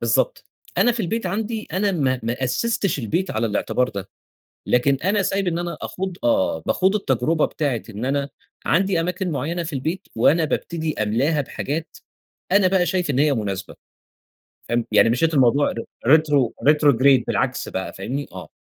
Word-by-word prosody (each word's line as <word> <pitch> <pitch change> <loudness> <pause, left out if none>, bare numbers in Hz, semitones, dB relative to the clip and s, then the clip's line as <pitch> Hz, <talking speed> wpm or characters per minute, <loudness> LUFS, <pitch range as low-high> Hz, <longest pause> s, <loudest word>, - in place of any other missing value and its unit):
بالضبط، - - 0 0.3
أنا 245 - +4
في 235 - -3
البيت 220 +2 -2
عندي 215 +4 -3
أنا 195 +2 +1
ما 130 -6 0
ما 120 +3 -2
أسّستش 195 - 0
البيت 170 - -1
على 110 +1 0
الاعتبار 125 +4 0
ده، 100 -4 -6 0.6
لكن 130 +3 +3
أنا 200 +2 +2
سايب 195 0 -1
إن 170 0 -1
أنا 175 0 -4
أخوض 190 -1 -4
آه، 285 -1 +2
باخوض 190 +2 +2
التجربة 155 - +1
بتاعة 140 -7 -2
إن 105 +3 -5
أنا 140 +1 -1 0.4
عندي 185 +2 +2
أماكن 180 +1 -2
معيّنة 160 +5 -2
في 165 - -6
البيت، 155 +7 -3
وأنا 160 +8 +4
بابتدي 160 0 -2
أملاها 135 +9 +1
بحاجات 150 +3 -4 0.6
أنا 195 -2 +5
بقى 180 -2 +2
شايف 180 -4 0
إن 135 - 0
هي 145 -1 +3
مناسبة، 100 -4 -4 0.9
فاهم؟ 120 -1 0
يعني 115 - +5
مشّيت 160 +7 +1
الموضوع 135 +2 +3
ر 115 - -5 0.2
retro 145 -5 +4 0.2
retrograde 140 -4 +4
بالعكس - - -1
بقى، 95 0 -4
فاهمني؟ 130 +9 -4
آه. - - -9
155 Hz, 165 wpm, -22 LUFS, 125-185 Hz, 0.9 s, أنا